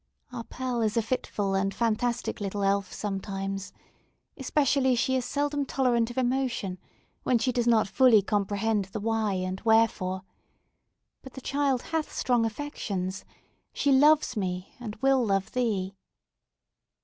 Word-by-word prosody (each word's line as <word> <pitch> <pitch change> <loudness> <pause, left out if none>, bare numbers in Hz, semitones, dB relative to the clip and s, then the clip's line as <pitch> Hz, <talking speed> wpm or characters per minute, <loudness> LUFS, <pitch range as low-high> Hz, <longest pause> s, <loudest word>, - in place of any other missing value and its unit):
"Our 235 -2 -5
Pearl 250 -2 -3
is 215 0 0
a - - +4
fitful 210 -4 -2
and 195 +1 0
fantastic 235 0 -1
little 200 0 -2
elf 195 -1 +1
sometimes. 195 -1 -4 0.6
Especially 270 -1 +2
she 260 +2 +1
is 255 - -2
generally 290 0 0
intolerant 250 -4 +1
of 240 - -9
emotion, 245 -7 -1 0.4
when 250 - +2
she 255 +3 0
does 240 -1 0
not 225 -3 +4
fully 225 -1 +5
comprehend 205 +1 0
the 195 +3 -6
why 220 -1 0
and 185 0 -3
wherefore. 220 -5 +2 1.0
But 265 - -12
the - - -8
child 275 -2 0
hath 320 -1 -2
strong 240 -3 +1
affections! 200 -7 -4 0.5
She 285 - +1
loves 295 +1 +5
me, 185 -3 -3
and 220 -4 -6
will 270 -2 +4
love 195 -3 0
thee!" 205 -6 -1
225 Hz, 140 wpm, -27 LUFS, 195-255 Hz, 1.0 s, fully